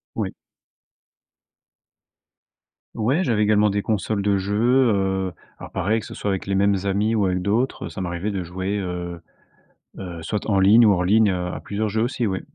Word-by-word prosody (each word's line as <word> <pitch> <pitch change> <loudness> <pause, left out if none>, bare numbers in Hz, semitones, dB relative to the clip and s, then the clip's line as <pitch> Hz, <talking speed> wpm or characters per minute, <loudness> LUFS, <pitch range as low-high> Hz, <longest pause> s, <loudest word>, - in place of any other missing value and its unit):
Oui. - - -2 2.6
Ouais, 130 +11 +1
j'avais 110 - +1
également 105 0 +3
des 100 0 -1
consoles 105 -1 -1
de 100 0 +1
jeu, 100 +2 -2 0.4
heu, 95 -2 -1 0.3
alors, - - -9
pareil, 105 +5 0
que - - -10
ce - - -9
soit - - -4
avec 95 -1 -3
les 95 0 0
mêmes 100 +1 +3
amis 105 +3 +1
ou 105 -3 +2
avec 90 0 0
d'autres, 110 +3 -1
ça 85 - -8
m'arrivait 90 +3 -3
de 95 - -2
jouer, 95 +4 -3
heu, 90 -2 -5 0.8
heu, 85 -4 -7
soit 105 +4 -3
en 100 -2 +2
ligne 110 +4 +6
ou 105 - +6
hors 90 -2 +1
ligne, 105 +3 +4
heu, 90 -1 -2
à - - -6
plusieurs 105 +1 -3
jeux 110 +2 0
aussi, 120 -1 -1
oui. 95 -2 -2
100 Hz, 185 wpm, -22 LUFS, 95-105 Hz, 2.6 s, ligne